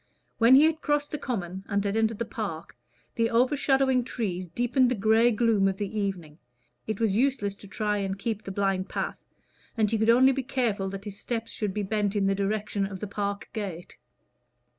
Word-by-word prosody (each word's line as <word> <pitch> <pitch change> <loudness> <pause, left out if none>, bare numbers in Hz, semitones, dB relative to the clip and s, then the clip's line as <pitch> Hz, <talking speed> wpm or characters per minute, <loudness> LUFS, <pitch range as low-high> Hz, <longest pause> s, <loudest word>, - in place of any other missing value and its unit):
When 235 +3 +7
he 280 - +7
had 320 0 +2
crossed 295 0 0
the 300 - -3
common 190 -8 -4
and 200 -1 0
had 200 +1 0
entered 220 -1 +1
the 235 - -2
park, 195 -8 -6 0.4
the 230 0 +1
overshadowing 265 +1 +2
trees 185 -7 -3
deepened 245 - +2
the 250 - 0
gray 220 +3 +4
gloom 220 -3 +2
of 195 -1 -1
the 205 +1 -4
evening; 185 -7 -3 0.5
it 220 -2 -3
was 220 -4 +1
useless 240 -5 +1
to 200 - -13
try 210 +1 -1
and 195 -1 -2
keep 215 +1 -3
the 195 - -6
blind 195 -1 -1
path, - - -3 0.6
and 215 -2 +2
he 225 - +1
could 220 +1 +2
only 255 +3 +6
be 270 0 -1
careful 235 -7 -1
that 195 +1 -7
his 205 -1 -7
steps 230 -2 -4
should 210 -3 -2
be 210 - -1
bent 205 0 -1
in 200 -1 +2
the 195 - +3
direction 200 0 -1
of 195 -1 -7
the 210 - -4
park 200 0 -4
gate. 190 -6 -6
210 Hz, 205 wpm, -27 LUFS, 195-235 Hz, 0.6 s, When